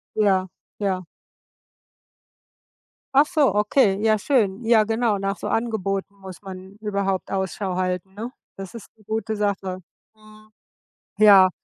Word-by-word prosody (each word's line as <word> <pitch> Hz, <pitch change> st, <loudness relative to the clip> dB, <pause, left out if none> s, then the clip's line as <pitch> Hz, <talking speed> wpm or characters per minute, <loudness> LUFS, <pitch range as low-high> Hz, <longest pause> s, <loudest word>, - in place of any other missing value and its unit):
Ja, 190 Hz, -3 st, +2 dB, 0.3 s
ja. 190 Hz, -3 st, -1 dB, 2.1 s
Ach 285 Hz, +2 st, +7 dB
so, 295 Hz, -, +2 dB
okay, 210 Hz, 0 st, +3 dB
ja 220 Hz, -1 st, +3 dB
schön. 220 Hz, -3 st, +1 dB
Ja, 225 Hz, -1 st, +5 dB
genau, 225 Hz, -1 st, 0 dB
nach 195 Hz, 0 st, -2 dB
so -, -, -6 dB
Angeboten 200 Hz, -4 st, -2 dB
muss 190 Hz, -1 st, -11 dB
man 190 Hz, 0 st, -10 dB
überhaupt 200 Hz, -3 st, -2 dB
Ausschau 190 Hz, 0 st, -2 dB
halten, 185 Hz, 0 st, -2 dB
ne? 230 Hz, +5 st, -6 dB, 0.2 s
Das 195 Hz, +3 st, -8 dB
ist 230 Hz, -, -10 dB
'ne 215 Hz, -, -22 dB
gute 220 Hz, +1 st, -2 dB
Sache. 195 Hz, -3 st, -2 dB, 0.4 s
Mhm. 215 Hz, 0 st, -18 dB, 0.7 s
Ja. 200 Hz, -3 st, +8 dB
200 Hz, 130 wpm, -23 LUFS, 190-220 Hz, 2.1 s, Ja